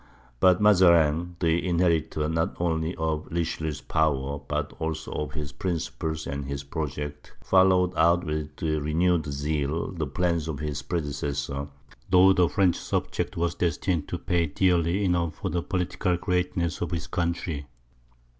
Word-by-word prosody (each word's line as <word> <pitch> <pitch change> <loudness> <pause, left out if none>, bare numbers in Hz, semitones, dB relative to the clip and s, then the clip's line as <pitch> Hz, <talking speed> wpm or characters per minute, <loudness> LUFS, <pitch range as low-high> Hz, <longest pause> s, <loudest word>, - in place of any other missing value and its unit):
But 90 -1 +5
Mazarin, 85 -4 +4
the 85 0 +2
inheritor, 85 -4 +1
not 80 +1 -1
only 80 0 0
of 80 -1 -2
Richelieu's 80 -3 -2
power, 70 -2 0
but 75 0 -2
also 80 -1 -3
of 75 - -4
his 75 -2 -5
principles 80 -2 -3
and 70 0 -4
his 70 0 -4
projects, 75 -1 -5
followed 95 -1 +4
out 85 +2 +4
with 75 -2 -4
renewed 80 +1 +1
zeal 75 +3 -2
the 80 -5 -3
plans 85 +2 0
of 80 -3 -3
his 75 -1 -3
predecessor, 70 -2 -3 0.4
though 95 +1 +7
the 90 -2 +3
French 95 -3 +2
subject - - -2
was 85 0 0
destined 85 -2 -1
to 90 - -3
pay 85 -1 0
dearly 90 +4 +2
enough 85 -3 0
for - - -4
the 90 - 0
political 90 0 -1
greatness 90 -2 -1
of 85 - -1
his 85 -2 -3
country. 85 -3 -2
80 Hz, 145 wpm, -26 LUFS, 75-90 Hz, 0.4 s, though